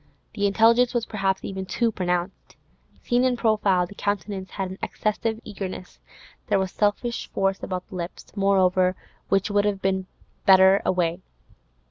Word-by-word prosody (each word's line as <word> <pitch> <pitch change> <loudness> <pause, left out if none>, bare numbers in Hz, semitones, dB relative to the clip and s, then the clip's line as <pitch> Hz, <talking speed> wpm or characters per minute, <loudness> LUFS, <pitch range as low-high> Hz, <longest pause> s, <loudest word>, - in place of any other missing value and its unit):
The 205 -2 +1
intelligence 230 +4 +4
was 235 -1 +1
perhaps 195 -3 -1
even 190 -1 -5
too 230 +4 0
pronounced; 180 -1 -3 0.5
seen 245 +1 +2
in 255 -1 +2
profile, 210 -6 +2
the 175 - -12
countenance 200 -1 -3
had 190 -2 -4
an 190 - -9
excessive 220 +1 -2
eagerness; 190 -4 -7 0.5
there - - +2
was 190 -1 -1
selfish 215 +3 -1
force 195 0 0
about 185 -1 -4
the - - -10
lips, 175 0 -6
moreover, 185 -2 +3 0.3
which 195 +1 +1
would 205 0 +2
have 205 -2 0
been 190 -1 0 0.4
better 190 0 +6
away. 175 -1 0
195 Hz, 150 wpm, -24 LUFS, 185-215 Hz, 0.5 s, better